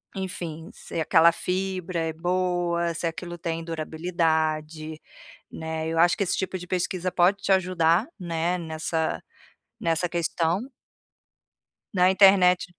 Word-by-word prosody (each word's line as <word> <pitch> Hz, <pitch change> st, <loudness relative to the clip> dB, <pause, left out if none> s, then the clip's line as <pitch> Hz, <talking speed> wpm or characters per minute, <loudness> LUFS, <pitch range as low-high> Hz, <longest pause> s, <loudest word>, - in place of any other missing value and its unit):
enfim, 170 Hz, -4 st, -5 dB
se -, -, -7 dB
aquela 165 Hz, +1 st, +5 dB
fibra 185 Hz, -1 st, -3 dB
é 160 Hz, -1 st, -1 dB
boa, 175 Hz, 0 st, 0 dB
se 170 Hz, -, -3 dB
aquilo 175 Hz, +1 st, -4 dB
tem 165 Hz, 0 st, -3 dB
durabilidade, 160 Hz, -1 st, -2 dB, 0.5 s
né, 160 Hz, 0 st, -4 dB
eu 165 Hz, 0 st, -1 dB
acho 175 Hz, +4 st, +4 dB
que 200 Hz, -, +1 dB
esse 180 Hz, -, 0 dB
tipo 190 Hz, 0 st, -2 dB
de 180 Hz, -, -9 dB
pesquisa 185 Hz, 0 st, -1 dB
pode 190 Hz, +3 st, +2 dB
te -, -, 0 dB
ajudar, 180 Hz, -, +3 dB
né, 170 Hz, 0 st, -1 dB
nessa 160 Hz, -1 st, -2 dB, 0.6 s
nessa 165 Hz, +1 st, 0 dB
questão 170 Hz, +2 st, 0 dB, 1.3 s
na 180 Hz, 0 st, +4 dB
internet 190 Hz, -1 st, +5 dB
170 Hz, 125 wpm, -25 LUFS, 160-180 Hz, 1.3 s, aquela